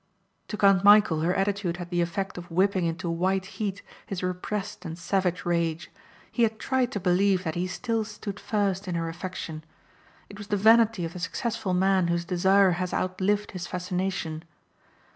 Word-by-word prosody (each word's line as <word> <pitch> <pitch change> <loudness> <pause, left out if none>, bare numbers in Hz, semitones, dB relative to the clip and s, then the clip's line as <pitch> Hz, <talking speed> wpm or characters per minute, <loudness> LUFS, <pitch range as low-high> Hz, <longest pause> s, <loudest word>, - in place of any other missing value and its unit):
To 210 - -5
Count 195 -2 +4
Michæl 200 -6 +6
her 180 +3 +1
attitude 195 -3 0
had 175 0 -7
the 175 0 +1
effect 185 +3 -2
of 175 - -11
whipping 185 +1 +2
into 170 +2 -2
white 185 +3 0
heat 200 0 -4 0.2
his 190 -2 -4
repressed 190 +2 -3
and 165 -2 -6
savage 180 0 -1
rage. 170 -1 -1 0.4
He 240 - -2
had 220 -1 +2
tried 260 +1 0
to 205 - -1
believe 185 +1 +2
that 160 -3 -2
he 175 +2 -1
still 225 +4 -1
stood 210 -1 -7
first 200 -2 -1
in 180 - -2
her 165 -1 -1
affection. 165 -2 -6 0.6
It 205 - -12
was 205 - -8
the 205 - 0
vanity 225 -2 +5
of 165 - -6
the 180 - -7
successful 205 +2 -2
man 190 -1 +3
whose 170 0 0
desire 190 +2 +4
has 180 - -2
outlived 190 +3 0
his 180 -1 -6
fascination. 180 -3 -3
185 Hz, 180 wpm, -27 LUFS, 175-205 Hz, 0.6 s, Michæl